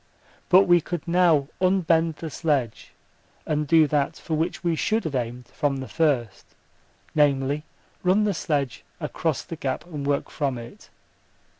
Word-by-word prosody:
But 185 +2 +7
we 175 -2 +4
could 175 0 -5
now 170 -5 +3
unbend 170 -4 +2
the 160 0 -7
sledge 140 -9 -1 0.5
and 150 -1 -1
do 160 +1 +6
that 150 +1 0
for 165 - -6
which 160 +4 -1
we 170 -2 +1
should 220 +7 0
have 160 - -4
aimed 120 -1 -3
from 145 -2 -1
the 130 -1 -6
first, 130 - -1 0.6
namely, 145 0 +2 0.4
run 185 +4 +3
the 210 -1 +1
sledge 145 -7 -2 0.2
across - - -2
the - - -8
gap - - -3
and 155 -5 -6
work 145 -1 -1
from 135 -4 -1
it. 120 0 -11
155 Hz, 155 wpm, -25 LUFS, 140-170 Hz, 0.6 s, But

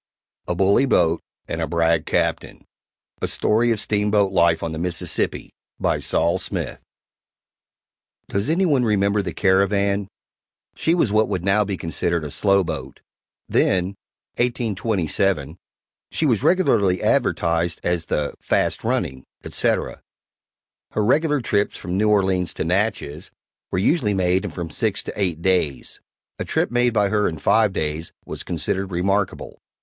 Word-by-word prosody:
A 90 - -1
BULLY 100 +8 +3
BOAT 85 -8 +2 0.3
AND - - -3
A - - -1
BRAG 85 -1 +1
CAPTAIN - - -1 0.6
A - - 0
Story 115 +3 +2
of 110 - 0
Steamboat 105 -1 +1
Life 85 -3 +3
on 85 - -2
the 80 - -5
Mississippi 85 -1 -2 0.3
BY - - +1
SOL 85 - +1
SMITH - - -4 1.5
Does 100 +5 -2
any 180 +4 +2
one 140 -7 +3
remember 100 -2 +2
the 90 -3 -4
Caravan? 100 +1 +2 0.7
She 165 - +1
was 130 - +1
what 110 0 +3
would 95 -4 -2
now 100 +2 +3
be 100 -1 -3
considered 85 0 -2
a 75 - -6
slow 100 +2 +3
boat - - -6 0.5
then 95 +1 +1 0.4
(1827) 100 - 0 0.5
she 160 - -1
was 120 -8 +2
regularly 105 - +3
advertised 85 0 +1
as 85 -2 -1
the 75 -1 -1
"fast - - 0
running," 65 0 -1 0.2
etc. - - -1 0.9
Her 105 - +1
regular 150 +3 +2
trips 105 -3 0
from 90 -2 -4
New 105 +2 +2
Orleans 95 -4 +1
to - - -2
Natchez 90 -4 -1 0.4
were - - -2
usually 105 - +2
made 90 0 +1
in - - -2
from 85 -3 -6
six 100 +1 0
to - - -6
eight 90 -5 -2
days; 90 -8 0 0.4
a - - -1
trip - - -1
made 120 0 +3
by 105 -3 +2
her 105 0 +2
in 80 - -6
five 110 +5 +3
days 80 -1 -3
was - - -5
considered 90 +3 -2
remarkable. 95 +2 -1
95 Hz, 145 wpm, -22 LUFS, 85-105 Hz, 1.5 s, BULLY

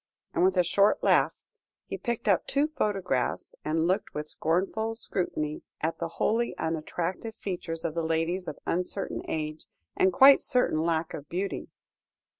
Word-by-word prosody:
and - - +2
with 185 0 +3
a 180 - +6
short 200 +4 +3
laugh - - +3 0.4
he - - -5
picked 235 -2 -3
up 195 -4 +3
two 285 +2 +2
photographs, 195 - -1
and 160 +1 +1
looked 185 +4 0
with 150 0 -3
scornful 195 +7 0
scrutiny 155 -8 -2 0.2
at 160 +1 -2
the 170 - -1
wholly 235 +2 +1
unattractive 165 +6 -3
features 175 -4 -5
of 160 - -1
the 165 - -1
ladies 165 +3 0
of 155 - -5
uncertain 180 +3 -2
age, 155 0 -4 0.3
and 190 - +4
quite 270 +9 +8
certain 250 -11 +1
lack 165 -1 0
of 145 0 -7
beauty. 190 +3 -3
175 Hz, 155 wpm, -28 LUFS, 160-200 Hz, 0.4 s, quite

